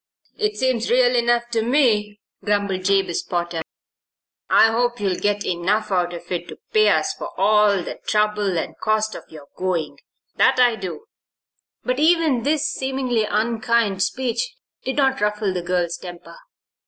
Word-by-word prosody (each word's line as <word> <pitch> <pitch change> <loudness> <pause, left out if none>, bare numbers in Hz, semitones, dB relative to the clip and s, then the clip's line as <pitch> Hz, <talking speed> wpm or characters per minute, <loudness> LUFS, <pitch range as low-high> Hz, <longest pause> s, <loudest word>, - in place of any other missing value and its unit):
"It 425 -2 -1
seems 255 -3 0
real 250 0 +4
enough 240 0 +2
to 230 -2 0
me," 220 -5 +1 0.2
grumbled 200 -2 -1
Jabez 195 -3 +1
Potter. 175 -2 -3 0.9
"I 225 - +6
hope 240 +1 0
you'll 195 -2 0
get 205 0 0
enough 200 +5 0
out 180 -2 +1
of 170 +1 -11
it 175 -1 -3
to - - -10 0.2
pay 430 -1 +5
us 390 - +1
for - - -8
all 205 -1 +3
the - - -7
trouble 210 -3 +1
and - - -3
cost 215 0 0
of - - -9
your 155 -3 -12
going 180 -4 -2 0.4
that - - +4
I 245 -2 +5
do." 195 - -7 0.8
But 250 +2 -1
even 315 -5 +3
this 295 +4 0
seemingly 260 -4 -1
unkind 220 -2 0
speech 260 - -1 0.3
did 265 - -3
not 270 -2 +1
ruffle 210 -1 0
the 180 - -2
girl's 175 -1 -1
temper. 175 -2 -10
215 Hz, 155 wpm, -21 LUFS, 185-245 Hz, 0.9 s, I